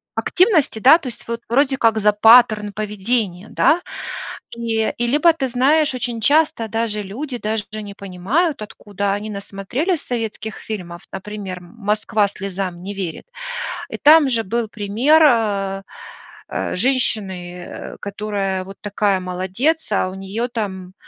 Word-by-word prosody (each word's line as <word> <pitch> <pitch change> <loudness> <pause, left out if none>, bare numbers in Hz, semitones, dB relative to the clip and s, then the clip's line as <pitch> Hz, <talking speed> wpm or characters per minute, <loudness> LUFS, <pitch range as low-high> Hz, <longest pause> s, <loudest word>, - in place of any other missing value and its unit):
активности, 350 - +3
да, 280 +9 +7
то 280 - -8
есть 245 - -7
вот, 235 0 -3
вроде 270 +2 +3
как 225 -2 +3
за 210 0 +4
паттерн 215 -1 +6
поведения, 210 -1 -2
да? 345 +3 +3 0.7
И, 225 -1 0
и 240 - 0
либо 300 +7 +5
ты 270 -5 -2
знаешь, 275 +4 +3
очень 245 -2 -3
часто, 295 -1 +3
даже 220 -1 -2
люди, 245 +7 -5
даже 215 -1 -2
не 210 -2 -6
понимают, 205 - -1
откуда 200 -1 -3
они 210 +2 -4
насмотрелись 210 - -2
советских 220 -2 -4
фильмов, 180 -5 -7
например: 195 -1 -6
"Москва 210 +2 0
слезам 190 -3 -5
не 200 +2 -6
верит". 185 - -5 0.6
И - - -5
там 300 -1 +7
же 230 -2 0
был 230 +3 -1
пример, 225 +10 +3
а, 200 -7 +2 0.7
э, - - -2
женщины, 190 -6 -1
э, - - -8
которая 200 -2 -2
вот 195 +1 -10
такая 205 -2 +1
молодец, 190 - -1
а 185 - +1
у 185 - -8
неё 195 +5 -3
там 190 -6 -5
215 Hz, 140 wpm, -20 LUFS, 195-245 Hz, 0.7 s, да